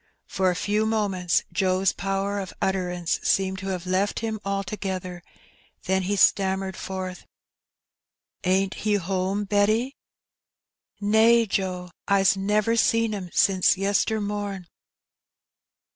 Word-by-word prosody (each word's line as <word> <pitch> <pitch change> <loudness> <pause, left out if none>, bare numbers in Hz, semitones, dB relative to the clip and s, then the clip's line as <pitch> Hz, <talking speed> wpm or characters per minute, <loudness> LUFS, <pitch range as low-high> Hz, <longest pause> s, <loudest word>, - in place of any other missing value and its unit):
For 190 -1 0
a 180 - 0
few 210 +4 0
moments 195 -5 0
Joe's 190 -1 +1
power 195 +1 -2
of 190 -2 -7
utterance 180 -3 -1
seemed 190 0 +1
to 190 - -6
have 185 -2 -3
left 190 +4 0
him 220 -1 -3
altogether, 190 -2 -4 0.6
then 190 +1 +1
he 195 +2 -1
stammered 190 -1 +2
forth 185 -1 -6 0.6
— - - -66 0.4
"Ain't 190 +1 +1
he 210 -1 0
home, 190 +1 -1
Betty?" 215 +6 +1 0.6
" - - -49
Nae, 225 +3 +4
Joe; 185 -3 -3 0.2
I's 195 -1 +4
never 210 +4 +1
seen 230 -1 +2
^im 190 -4 -5
sin 190 -2 +2 0.2
yester 200 +2 +1
mom! 205 -2 -4
195 Hz, 125 wpm, -25 LUFS, 185-205 Hz, 0.6 s, Nae